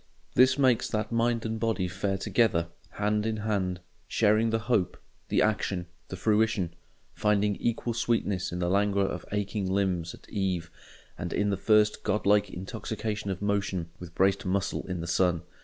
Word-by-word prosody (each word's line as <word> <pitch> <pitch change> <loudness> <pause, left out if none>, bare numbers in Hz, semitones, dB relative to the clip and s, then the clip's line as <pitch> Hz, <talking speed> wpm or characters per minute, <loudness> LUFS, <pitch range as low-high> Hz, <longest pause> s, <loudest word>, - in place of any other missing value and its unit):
This 130 +2 +5
makes 130 -4 +3
that 110 +1 -2
mind 115 0 +1
and 110 0 -2
body 110 -5 0
fare 95 +2 -2
together, 90 -7 +1 0.2
hand 105 0 0
in 110 -1 -1
hand, 95 -4 -1 0.3
sharing 110 +1 +3
the 115 - +1
hope, 110 -7 +1 0.3
the - - +3
action, 100 -4 0 0.2
the - - -6
fruition; 105 -2 +1 0.4
finding 105 -1 +2
equal 120 0 -1
sweetness 105 -5 0
in 90 - -3
the 90 -1 0
languor 100 +1 +2
of - - -5
aching 100 -1 -2
limbs 95 -4 0
at - - -20
eve 95 -5 -2 0.5
and 85 -1 -4
in 105 0 +1
the - - +1
first 105 +2 +3
god 105 - -1
like 105 0 +4
intoxication 105 +2 -4
of 95 +1 -3
motion 100 -4 -1
with 90 -1 -10
braced 95 +1 +2
muscle 100 +1 -1
in 90 -2 -3
the - - -4
sun. 85 0 +2
100 Hz, 170 wpm, -28 LUFS, 95-110 Hz, 0.5 s, This